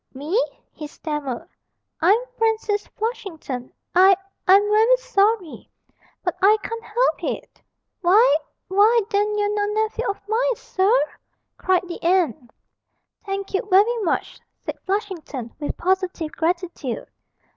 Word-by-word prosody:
'Me?' 320 - 0 0.3
he 300 - -8
stammered, 295 -5 -5 0.5
'I'm 375 +6 +5 0.2
Francis 445 -2 0
Flushington. 345 - -5 0.2
I 380 +2 +7 0.3
I'm 390 +2 +7
very 440 +4 +5
sorry 435 -7 0 0.5
but 355 - -1
I 415 +3 +6
can't 460 0 -5
help 485 +3 0
it!' - - -5 0.4
'Why 425 +8 +5 0.3
why 425 +5 +4
then 415 +1 +1
you're 415 0 +1
no 410 -1 0 0.2
nephew 450 +2 -3
of 400 - -3
mine, - - +1
sir!' 410 +5 +2 0.6
cried 370 -1 +1
the 345 - -7
aunt. 330 -8 +1 0.8
'Thank 390 0 -4
you 390 - +2
very 410 +6 +5
much,' 390 -6 -2 0.2
said - - -7
Flushington, 350 - -3
with 295 - -4
positive 365 -3 -1
gratitude. 340 -7 -2
390 Hz, 125 wpm, -22 LUFS, 345-435 Hz, 0.8 s, I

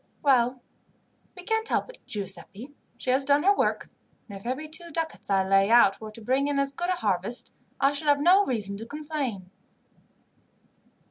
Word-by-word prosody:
"Well, 250 -2 +2 0.7
we 360 - -9
can't 445 +2 0
help - - 0
it, - - -17
Giuseppi. 205 +5 -5 0.2
She 255 - -1
has 265 +2 +2
done 285 +2 +3
her 400 +2 +5
work; - - 0 0.4
and 200 - -9
if 195 +4 -9
every 265 +5 -3
two 335 +2 -3
ducats 325 -6 -5
I 190 -1 +2
lay 195 +1 +4
out 225 -4 +5
were 215 - -7
to 215 +2 -11
bring 260 +5 +1
in 290 -1 -1
as 275 0 +1
good 350 +5 -3
a - - +3
harvest, 210 - -2 0.3
I 275 - +4
should 290 +1 -5
have 290 -1 +4
no 365 +7 +5
reason 210 - -2
to 225 - -8
complain." 280 - -5
265 Hz, 185 wpm, -26 LUFS, 215-305 Hz, 0.7 s, her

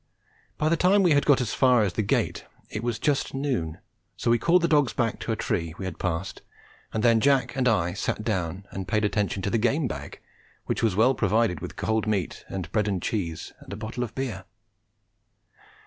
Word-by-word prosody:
By 155 - +1
the 165 - +3
time 190 +4 +4
we 175 - +4
had 145 -1 +3
got 140 -3 +5
as 115 -3 -2
far 125 -4 +4
as 95 -3 -1
the 110 - 0
gate 100 - 0 0.3
it 110 - -3
was 120 -2 -1
just 145 -2 0
noon, 125 - -2 0.4
so 115 - +1
we 120 - +4
called 170 +7 +3
the - - +4
dogs 145 -5 +3
back 115 -3 -1
to - - -3
a - - +1
tree 85 -7 -2
we 95 - -5
had 95 - -6
passed, 90 +1 -3 0.5
and 110 - -2
then 115 -2 +5
Jack 135 +2 +2
and 130 -2 +1
I 90 -7 +2
sat 110 +2 -2
down 95 -3 -2
and 95 -1 -5
paid 105 0 +1
attention 100 -2 -1
to 100 - -1
the 115 - +2
game 130 +6 +1
bag, - - -7 0.5
which - - -1
was 110 -5 +2
well 115 +6 +4
provided 110 - +1
with 90 +3 -7
cold 110 0 -1
meat 100 -4 -1
and 90 -4 -5
bread 105 -2 +1
and 100 -3 0
cheese 85 -5 -3
and - - -13
a - - -4
bottle 110 +3 -4
of 115 -2 -7
beer. 130 -3 -4
110 Hz, 215 wpm, -26 LUFS, 95-130 Hz, 0.5 s, got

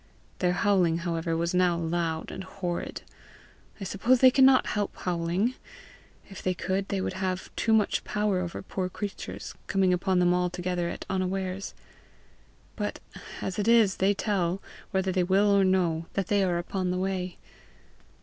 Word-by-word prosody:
Their 180 -1 +2
howling, 180 -4 +2
however, 165 -1 -1
was 170 +1 -1
now 180 -1 +3
loud 165 -1 -2
and 190 - -6
horrid. 185 -2 -4 0.8
I - - -5
suppose 215 +7 +2
they 255 0 +8
cannot 265 0 +6
help 205 -1 -2
howling; 180 +6 0 0.7
if 195 - -10
they 185 0 0
could, 190 +2 -2
they 200 - -1
would - - -2
have 185 -1 -3
too 225 - 0
much 220 -2 +3
power 210 -3 0
over 175 -2 -4
poor 185 -1 -3
creatures, 200 +2 -6
coming 190 -2 +2
upon 185 +1 +1
them 180 0 +4
altogether 180 -1 -1
at - - -6
unawares; 190 0 -2 1.0
but - - -3 0.4
as 190 +1 -3
it 205 - 0
is, 225 -5 +5
they 195 +2 +2
tell, 190 -3 0 0.3
whether 190 0 0
they 185 0 +1
will 195 +3 +3
or 200 - +5
no, 175 -4 +1
that 195 -2 -2
they 205 -1 +3
are 180 -2 +1
upon 180 +1 -2
the 180 - 0
way. 185 -1 -2
185 Hz, 160 wpm, -27 LUFS, 180-195 Hz, 1.0 s, they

